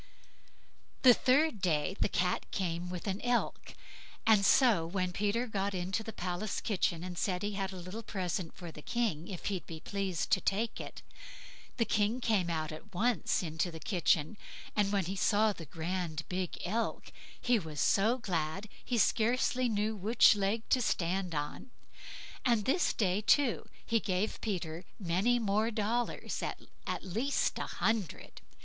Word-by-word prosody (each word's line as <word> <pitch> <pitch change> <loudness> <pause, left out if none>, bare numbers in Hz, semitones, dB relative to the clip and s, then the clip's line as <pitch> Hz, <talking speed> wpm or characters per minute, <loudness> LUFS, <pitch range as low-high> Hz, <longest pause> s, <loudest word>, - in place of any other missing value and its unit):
The 250 -2 +10
third 265 -2 +2
day 165 0 +1
the - - +2
Cat 180 0 0
came 175 -2 -2
with 180 -1 -5
an 195 0 -2
elk. 245 0 -1 0.5
And 215 -3 +5
so 225 -4 +5
when 185 0 -1
Peter 210 +5 0
got 200 -3 -2
into 185 +4 -1
the 225 - -6
palace 180 +2 -3
kitchen, 180 -5 0
and 180 -1 -5
said 180 -2 -1
he 205 - -1
had 195 -1 -2
a - - -8
little 185 +5 -6
present 185 -5 -3
for 175 -2 -7
the 150 - -11
King, 180 -6 -1
if 185 -4 -7
he'd 190 -6 -2
be 160 -1 -7
pleased 195 -2 -2
to - - +4
take 215 +4 -1
it, - - -9 0.7
the 230 - +2
King 215 +4 +1
came 210 -8 +1
out 160 -2 -2
at 180 +5 -10
once 220 -2 +1
into 160 +1 -1
the 165 -1 -8
kitchen; 170 +1 +1 0.4
and 205 -1 +2
when 200 -3 +1
he 190 +3 -3
saw 210 +2 +3
the 165 -5 -10
grand 165 -1 -3
big 185 -1 -3
elk, 225 +6 -2 0.3
he 245 -2 +3
was 155 -5 -7
so 215 - +3
glad 185 -1 -2
he 245 - -1
scarce 235 +4 +2
knew 220 -4 0
which 215 +3 +5
leg 205 +3 -1
to 255 - +4
stand 180 -4 0
on; 150 - -4 0.7
and 235 -5 +2
this 350 +7 +2
day, 195 -1 +1
too, 265 +3 +3 0.2
he 230 - +2
gave 195 +1 -1
Peter 175 -5 -3
many 190 +5 +1
many 240 - +2
more 210 +3 +2
dollars—at 230 +2 -3
least 230 +10 0
a - - -3
hundred. 220 -8 -2
195 Hz, 165 wpm, -32 LUFS, 175-220 Hz, 0.7 s, The